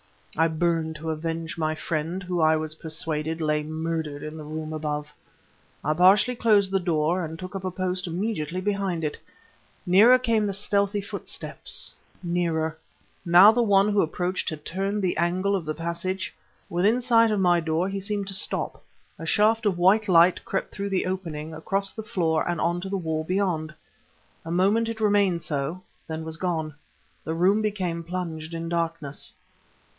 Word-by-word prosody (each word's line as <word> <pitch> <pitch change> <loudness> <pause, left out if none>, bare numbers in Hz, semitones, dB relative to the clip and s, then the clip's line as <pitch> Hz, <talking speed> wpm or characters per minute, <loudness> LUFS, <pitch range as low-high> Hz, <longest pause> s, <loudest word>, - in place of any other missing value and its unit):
I 160 +1 +3
burned 160 0 0
to 160 +1 -4
avenge 165 +1 -4
my 155 0 0
friend, 165 +4 -3
who 180 -1 -2
I 160 0 +5
was 155 0 -2
persuaded, 160 0 -2
lay 150 -1 +1
murdered 155 -1 -3
in 155 +1 -6
the 155 - -8
room 155 +1 -5
above. 150 -1 -4 0.7
I 150 - +1
partially 195 +8 +5
closed 210 -4 +3
the 195 - +2
door 170 0 0
and 160 0 -5
took 185 +3 -8
up 190 -1 -5
a - - 0
post 185 0 -2
immediately 180 -2 -2
behind 195 -4 -1
it. 150 - -3 0.7
Nearer 210 +8 +7
came 230 -4 +1
the 200 - -1
stealthy 200 +1 +1
footsteps 200 - -1 0.3
nearer.... 165 -2 -1 0.5
Now 180 +5 +8
the 240 +2 +1
one 200 -2 +4
who 205 -1 +3
approached 180 +3 -1
had 155 -2 -7
turned 195 +3 -2
the 180 - 0
angle 185 +4 +1
of 180 -4 -3
the 155 0 -3
passage.... 180 +4 -3 0.4
Within 200 +8 +2
sight 230 -2 +5
of 210 -2 +1
my 175 -2 +4
door 165 +2 0
he 195 0 -3
seemed 200 0 -2
to - - -4
stop; 190 - -2 0.4
a - - -6
shaft 220 +1 +3
of 190 -4 +1
white 200 +5 +4
light 175 0 +5
crept 195 - -3
through 200 0 -3
the 190 -1 0
opening, 165 -4 -4
across 195 +5 -1
the 220 - -7
floor 165 -6 0
and 175 -2 -1
on 175 +2 0
to 190 - -5
the 195 - -1
wall 160 -3 -2
beyond. 175 -3 -1 0.7
A - - -6
moment 200 +6 +2
it 225 -1 -5
remained 200 -5 +2
so 150 +5 -2 0.2
then 160 0 -4
was 160 0 -6
gone. 160 -4 -2 0.5
The 160 - -3
room 190 +5 +3
became 185 -6 -2
plunged 165 -2 -5
in 165 0 -4
darkness. 165 -4 -3
175 Hz, 175 wpm, -25 LUFS, 160-195 Hz, 0.7 s, Now